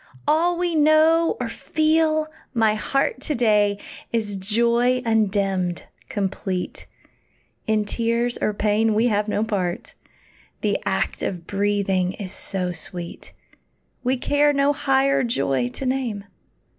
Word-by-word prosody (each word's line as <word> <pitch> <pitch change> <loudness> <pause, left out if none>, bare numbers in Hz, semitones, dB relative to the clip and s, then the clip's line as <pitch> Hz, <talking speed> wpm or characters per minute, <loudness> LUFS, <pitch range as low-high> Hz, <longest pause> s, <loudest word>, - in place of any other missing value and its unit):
all 340 +3 +3
we 350 -1 0
know, 315 +2 +4
or 245 - -2
feel, 310 +4 +1 0.3
my 220 -2 +3
heart, 265 +4 -1
To 300 - -2
day 210 -4 +3 0.3
is 215 -3 -1
joy 235 +5 +1
undimmed, 195 -5 0 0.3
complete; 190 -2 -3 0.8
In 215 -1 +1
tears 235 +2 0
or - - +2
pain 210 +1 +1
we 230 +3 +3
have 210 0 0
no 210 0 0
part; 200 -3 -3 0.7
The - - 0
act - - -1
of 175 -3 -3
breathing 195 -2 0
is 195 -2 -6
so 185 -2 -2
sweet, 175 0 -8 0.7
We 260 +1 +1
care 290 +3 +2
no 280 +1 +3
higher 275 0 +2
joy 135 - 0
to 265 - -7
name. 255 -6 -2
225 Hz, 125 wpm, -23 LUFS, 200-270 Hz, 0.8 s, know